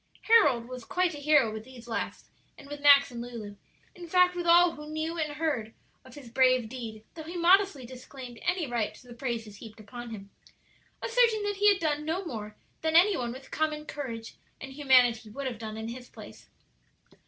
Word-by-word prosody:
Harold 290 - +4
was 255 -1 -8
quite 360 +6 0
a - - -7
hero 285 -6 +3
with 220 0 -6
these 245 -1 -13
last 230 - -5 0.3
and 280 - -13
with 290 0 -8
Max 280 -1 +7
and 235 -1 -6
Lulu; 230 -4 -8 0.4
in 355 -3 -10
fact, 360 +1 +4
with 350 -1 -3
all 345 +1 +6
who 300 -1 -10
knew 315 +2 -3
or 305 -2 -2
heard 285 -9 -2 0.3
of 260 -1 -15
his 285 -4 -11
brave 255 -1 +3
deed, 225 -3 -8
though 325 - -8
he 335 +3 -7
modestly 350 -5 +3
disclaimed 250 -1 -10
any 360 -2 0
right 240 -5 -2
to 250 - -17
the 240 - -10
praises 230 -5 -5
heaped 220 0 -12
upon 240 +3 -9
him, 200 -3 -9 0.7
asserting 460 -2 +2
that 410 -1 -2
he 410 +1 +6
had 395 - 0
done 300 -3 -1
no 335 +5 -2
more 215 -8 -6 0.3
than 320 0 0
any 375 +4 +6
one 240 -6 -3
with 265 +2 -11
common 305 -1 -1
courage 235 -7 -7 0.2
and 265 0 -8
humanity 250 -5 +3
would 275 +6 -6
have 245 -4 -4
done 220 -1 -6
in 220 +1 -5
his 245 +1 -9
place. 215 - -13
265 Hz, 200 wpm, -28 LUFS, 235-320 Hz, 0.7 s, Max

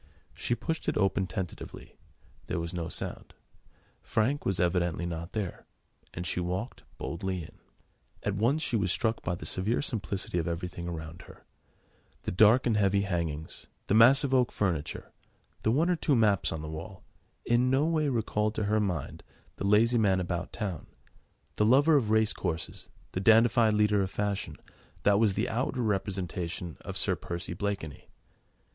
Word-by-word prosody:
She 120 - -1
pushed 160 +5 -3
it - - -1
open 95 -2 +1
tentatively: 90 -1 -7 0.5
there - - -2
was 85 +1 -4
no 85 -2 -3
sound: - - -6 0.7
Frank 130 +7 0
was 95 -2 0
evidently 85 -1 +1
not 85 +1 -5
there, 100 -5 -4 0.4
and 85 - -5
she 90 - -1
walked 90 +7 -3 0.2
boldly 90 +1 -3
in. - - -14 0.6
At 100 - 0
once 120 +10 +1
she 120 - -1
was 100 -5 +1
struck 110 +4 0
by 85 - -2
the - - -9
severe 105 +6 0
simplicity 100 - -2
of 80 - -2
everything 85 0 -4
around 80 -1 -6
her: - - -15 0.8
the - - -2
dark 110 +6 +5
and 115 -3 +2
heavy 100 -1 +3
hangings, 85 -5 -3 0.2
the - - 0
massive 130 +5 +6
oak 125 -2 +3
furniture, 85 -7 -2 0.5
the - - +1
one 150 +9 +3
or 180 - +3
two 150 -3 +1
maps 105 -5 +3
on 80 -1 -4
the - - -5
wall, 85 +5 -8 0.4
in 120 +2 +3
no 135 +3 +3
way 155 -3 +1
recalled 110 -3 0
to 110 - -1
her 105 +1 +2
mind 90 -8 -2 0.4
the 100 - -2
lazy 115 +4 +4
man 95 -4 +3
about 90 -1 -3
town, 95 - -4 0.7
the - - +3
lover 140 +8 +5
of 120 -7 +2
race 110 -1 +3
courses, 85 -3 -4 0.2
the - - -2
dandified 110 +1 +5
leader 105 -1 +3
of 95 - -1
fashion, 100 -6 -2 0.5
that 100 0 +4
was 105 -4 +3
the 110 +4 0
outward 125 +3 -1
representation 90 -5 -2
of - - -4
Sir - - +2
Percy 85 +1 -5
Blakeney. 95 -5 -4
100 Hz, 165 wpm, -29 LUFS, 90-115 Hz, 0.8 s, massive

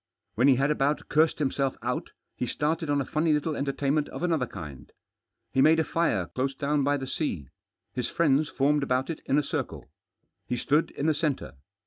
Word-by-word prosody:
When 120 +5 +3
he 135 - +6
had 140 +3 +2
about 145 0 0
cursed 155 +1 +3
himself 135 -2 0
out, 125 +1 -2 0.3
he 125 - -2
started 155 +4 -1
on 145 -1 +2
a - - -3
funny 155 +3 +1
little 150 +1 0
enter 140 0 -1
tainment 145 +2 0
of - - -7
another 160 -8 +1
kind. 75 - -9 0.6
He 130 - +3
made 160 +3 +6
a - - +3
fir§ 155 - 0
close 135 +1 -1
down 145 +1 0
by 145 +1 +2
the 135 - -5
sea. 90 - -3 0.4
His 125 -2 -2
friends 150 -2 +2
formed 145 +2 +2
about 130 +2 0
it 165 - -7
in 140 - +3
a 150 - +3
circle. - - -4 0.6
He 125 - -1
stood 150 +6 +2
in 140 - -4
the 160 - +4
centre. 150 -3 -2
140 Hz, 200 wpm, -27 LUFS, 130-155 Hz, 0.6 s, he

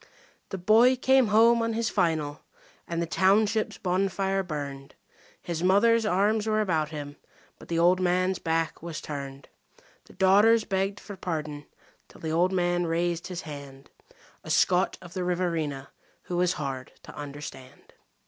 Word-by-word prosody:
The 195 - -4
boy 225 +7 +5
came 265 -1 +3
home 230 +3 +5
on 230 0 -1
his 230 0 -1
"final", 160 -6 0 0.5
and 170 -1 -3
the 170 - 0
township's 205 +5 +2
bonfire 195 +1 0
burned. 140 -5 -6 0.5
His 170 -2 -4
mother's 215 +5 +4
arms 210 +3 +1
were 215 0 +1
about 160 -7 0
him; 145 -2 -7 0.4
but - - -13
the 165 - -2
old 175 +2 +4
man's 185 +1 +1
back 165 0 -1
was 165 -1 -6
turned. 140 -2 -7 0.6
The - - -17
daughters 205 +4 +4
begged 195 +1 -1
for 205 - -9
pardon 155 -5 -5 0.4
till - - -17
the 160 - -3
old 175 +3 +2
man 175 -1 0
raised 170 +1 -1
his 180 -2 -5
hand 140 -3 -10 0.5
A - - -10
Scot 180 0 +2
of 175 -1 -12
the 185 - -3
Riverina 165 -6 -2 0.3
who 180 - -5
was 180 0 +2
hard 135 -5 -5
to - - -12
understand. 140 -3 -9
180 Hz, 155 wpm, -27 LUFS, 155-195 Hz, 0.6 s, boy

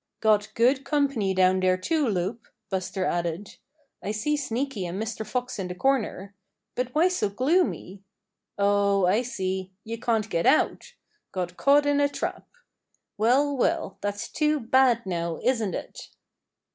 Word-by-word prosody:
"Got 215 -1 +2
good 260 +4 +3
company 275 -10 0
down 185 0 +4
there, 185 0 +2
too, 305 - 0
Loup," 200 +3 -2 0.2
Buster 190 0 -2
added. 175 +3 -3 0.4
"I - - -5
see 215 +8 0
Sneaky 260 -7 -3
and 180 +3 -5
Mr. 220 0 -3
Fox 250 +1 -4
in 190 - -3
the 180 - -6
corner. 210 -5 -1 0.4
But 250 +1 -3
why 330 +4 +5
so 360 - 0
gloomy? 255 - 0 0.6
Oh, 200 -1 +3
I 200 +6 +3
see, 190 -5 -3
you 230 +1 -6
can't 225 -2 0
get 170 -5 0
out! 300 - +2 0.4
Got 180 -2 -4
caught 285 +5 +4
in 290 0 +2
a 285 - +3
trap. - - -4 0.7
Well, 270 +6 +3
well, 195 -6 -1
that's 205 +2 -3
too 300 -1 +1
bad 245 -1 +3
now, 170 -3 -3
isn't 225 -7 +1
it?" - - -8
220 Hz, 150 wpm, -26 LUFS, 190-265 Hz, 0.7 s, why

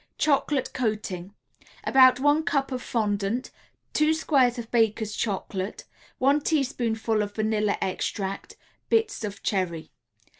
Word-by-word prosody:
CHOCOLATE 285 -2 +1
COATING 210 -5 -3 0.5
About 255 -1 +6
one 290 +3 +3
cup 275 -3 0
of 255 -1 -3
fondant, 210 +1 -1 0.4
2 305 +1 +3
squares 270 -6 +2
of 230 -1 -7
Baker's 220 -2 +1
Chocolate, 195 -2 -3 0.3
1 280 +3 +3
teaspoonful 235 -7 0
of 205 0 -4
vanilla 215 -1 0
extract, 195 +1 -3 0.3
Bits 445 - +1
of 205 -1 -6
cherry. 175 -5 -2
225 Hz, 115 wpm, -26 LUFS, 205-270 Hz, 0.5 s, About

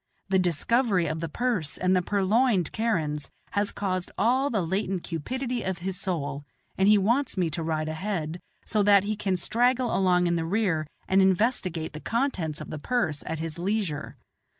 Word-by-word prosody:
The 190 -1 +3
discovery 185 - +2
of 160 0 -2
the 165 0 -3
purse 210 - 0
and 185 +1 +2
the 180 - +3
purloined 200 - +2
kerans 155 -11 -1 0.2
has 205 0 0
aroused 185 -3 -1
all 255 +7 +2
the 210 -8 0
latent 190 0 -1
cupidity 245 - -3
of 190 -3 -2
his 190 -1 -2
soul, 145 -7 -3 0.3
and 190 - +2
he 210 0 +7
wants 235 +6 +1
me 175 -3 +1
to 165 +2 -2
ride 160 -1 -1
ahead, 160 0 -3 0.3
so 215 - +2
that 200 -1 +6
he 215 +1 -1
can 195 -3 -1
straggle 245 +6 +1
along 180 -2 +3
in 170 0 +1
the 165 - -1
rear 175 -5 0 0.2
and 190 +1 +4
investigate 190 -4 +1
the 155 - -6
contents 190 - -1
of - - -8
the 155 - -5
purse 155 - -1
at 160 - -2
his 160 +1 -5
leisure. 190 -5 -2
190 Hz, 180 wpm, -27 LUFS, 165-215 Hz, 0.3 s, he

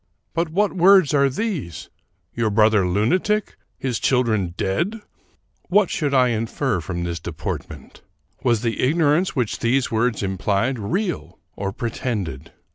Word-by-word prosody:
But 165 0 0
what 200 +5 +1
words 185 -4 +5
are 140 -1 +4
these? 140 - -4 0.4
Your 115 -2 0
brother 105 -2 +3
lunatic! 180 - +1 0.2
His 125 -4 -2
children 110 -9 +1
dead! 175 - -1 0.3
" - - -41
What 200 0 +3
should 145 -3 -1
I 130 -2 +4
infer 115 - -1
from 85 +2 -4
this 85 -1 -3
deportment? - - -7 0.4
Was 120 -3 +2
the 115 -1 -1
ignorance 155 +5 +2
which 125 -6 -1
these 125 +2 +1
words 115 -1 0
implied 100 +6 0
real 175 - -3 0.2
or 100 0 -3
pretended? 100 - -4
120 Hz, 135 wpm, -22 LUFS, 100-160 Hz, 0.4 s, words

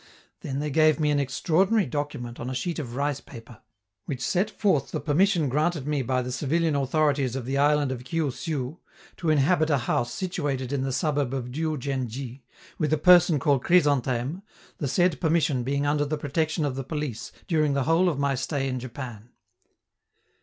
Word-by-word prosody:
Then 135 - -4
they 150 +1 -2
gave 155 +1 +4
me 150 -1 +2
an 145 - +2
extraordinary 180 - +2
document 140 -3 -4
on 120 - -4
a 130 - -4
sheet 165 +6 -2
of 120 -5 -6
rice 140 0 -1
paper, 115 -2 -13 0.4
which 125 -3 -4
set 190 +4 +1
forth 190 - +1
the - - -3
permission 165 +2 +2
granted 150 +2 0
me 150 -2 0
by 130 0 0
the 125 - -5
civilian 155 +4 0
authorities 140 -2 +1
of 130 -3 -4
the 135 +2 -1
island 145 -1 +3
of 125 -1 -5
Kiu 155 +1 -1
Siu, 150 +2 -4 0.4
to 170 - -2
inhabit 155 +2 +3
a 145 - +3
house 120 -1 -1
situated 145 -9 -3
in 140 - 0
the 135 0 -1
suburb 145 -2 0
of 125 -2 -4
Diou 155 +2 -2
djen 135 -1 -2
dji, 130 +2 -7 0.4
with 155 -3 0
a 155 - +3
person 175 0 +6
called 140 -2 +1
Chrysantheme, 145 -2 +2 0.4
the 145 - -1
said 175 +4 +1
permission 160 -6 +2
being 140 +3 -1
under 145 0 +2
the 150 +1 -2
protection 155 +2 -1
of 135 -3 -2
the 135 - -3
police 150 -4 -4 0.2
during 155 -4 +2
the 140 - +1
whole 165 +6 +3
of 155 - -2
my 140 0 +1
stay 135 +1 -2
in 130 -1 -2
Japan. 120 -3 -8
145 Hz, 190 wpm, -26 LUFS, 130-155 Hz, 0.4 s, person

